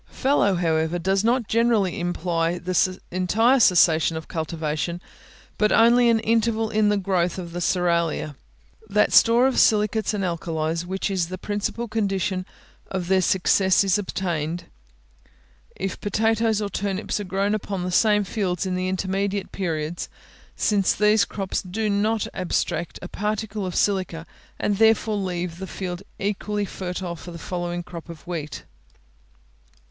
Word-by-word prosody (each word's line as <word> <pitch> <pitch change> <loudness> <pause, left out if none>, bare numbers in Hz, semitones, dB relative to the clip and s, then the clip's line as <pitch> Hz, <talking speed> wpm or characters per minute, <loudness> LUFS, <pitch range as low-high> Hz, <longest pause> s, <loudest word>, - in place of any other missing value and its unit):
Fallow, 260 -8 +2
however, 160 -1 0
does 190 +3 +1
not 235 0 +1
generally 225 -5 +2
imply 170 -1 -1
an 185 0 -2 0.4
entire 220 +9 +3
cessation 165 -5 +4
of 160 - -7
cultivation, 160 +1 -3 0.6
but 210 0 +3
only 235 +1 +5
an 230 -1 +4
interval 225 0 +1
in 215 -1 +3
the 210 - +2
growth 180 -2 0
of 175 -2 -6
the 175 - -4
cerealia. 170 -4 0 0.5
That 210 +1 +2
store 235 +2 +6
of 265 - +2
silicates 215 0 +2
and 200 - -2
alkalies 165 -1 -2
which 190 +2 -2
is 180 -3 0
the 185 +1 -6
principal 210 +4 -3
condition 195 -4 -1 0.4
of 185 -2 -4
their 190 -1 +4
success 190 +1 +3
is 195 0 +2
obtained, 175 -4 -3 1.1
if 195 -1 -4
potatoes 220 +1 +1
or 205 - -2
turnips 200 +1 -2
are - - -3
grown 195 +2 0
upon 200 -3 -3
the 180 - -2
same 210 +2 +3
fields 190 -3 -2
in 185 - -2
the 185 0 -1
intermediate 195 +1 -2
periods, 165 -3 -3 0.5
since 200 -3 +2
these 210 0 +4
crops 195 -2 -3
do 210 +3 -2
not 215 +2 +1
abstract 175 -2 -2
a - - -5
particle 210 0 -3
of 180 - -5
silica, 185 -5 0 0.3
and 205 -1 0
therefore 220 -1 +3
leave 180 -3 -3
the 190 - -5
field 180 -2 -5 0.2
equally 205 +1 -2
fertile 180 -2 -5
for 175 - -10
the 170 - -8
following 175 0 -4
crop 170 -1 -10
of 165 -2 -10
wheat. 160 -4 -5
190 Hz, 150 wpm, -24 LUFS, 175-210 Hz, 1.1 s, store